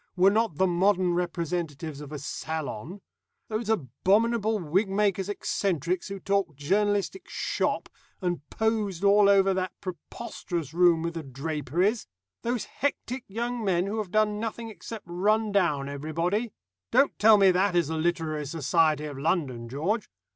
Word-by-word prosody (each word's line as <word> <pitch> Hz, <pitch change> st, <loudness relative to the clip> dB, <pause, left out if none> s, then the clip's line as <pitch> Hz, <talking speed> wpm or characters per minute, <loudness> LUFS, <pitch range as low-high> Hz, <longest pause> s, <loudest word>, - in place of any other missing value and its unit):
were 190 Hz, +1 st, +5 dB
not 220 Hz, -4 st, +1 dB
the 190 Hz, -, +4 dB
modern 185 Hz, 0 st, +2 dB
representatives 170 Hz, -4 st, -3 dB
of 145 Hz, -1 st, -9 dB
a 150 Hz, -, -4 dB
salon. 155 Hz, -, -5 dB, 0.5 s
Those 215 Hz, 0 st, -3 dB
abominable 220 Hz, -, +2 dB
wig 190 Hz, +3 st, 0 dB
makers' 195 Hz, -1 st, +1 dB
eccentricities 180 Hz, -4 st, -1 dB
who 195 Hz, -1 st, -6 dB
talked 195 Hz, -7 st, 0 dB
journalistic 205 Hz, -, 0 dB
'shop,' -, -, -1 dB, 0.3 s
and 175 Hz, -4 st, -1 dB
posed 215 Hz, -5 st, -1 dB
all 200 Hz, 0 st, +6 dB
over 195 Hz, -1 st, +5 dB
that 185 Hz, -1 st, -3 dB
preposterous 175 Hz, -, -6 dB
room 170 Hz, -2 st, +4 dB
with 170 Hz, 0 st, -2 dB
the 165 Hz, -, -4 dB
draperies! 155 Hz, -, -1 dB, 0.3 s
Those 240 Hz, -1 st, -1 dB
hectic 260 Hz, -2 st, -3 dB
young 235 Hz, +3 st, -3 dB
men 180 Hz, -3 st, +2 dB
who 210 Hz, +3 st, -2 dB
have 210 Hz, -4 st, -3 dB
done 210 Hz, +1 st, +2 dB
nothing 225 Hz, 0 st, -4 dB
except 220 Hz, 0 st, -9 dB
run 210 Hz, +5 st, +1 dB
down 160 Hz, -9 st, +1 dB
everybody! 165 Hz, +10 st, -2 dB, 0.4 s
Don't 280 Hz, -, +3 dB
tell 215 Hz, +1 st, +7 dB
me 195 Hz, -2 st, +6 dB
that 185 Hz, +1 st, +2 dB
is 170 Hz, -4 st, +2 dB
the 160 Hz, -, -2 dB
literary 155 Hz, -3 st, -1 dB
society 155 Hz, 0 st, +2 dB
of 145 Hz, -2 st, -6 dB
London, 135 Hz, -7 st, -1 dB
George. 175 Hz, -, -1 dB
185 Hz, 145 wpm, -27 LUFS, 160-210 Hz, 0.5 s, tell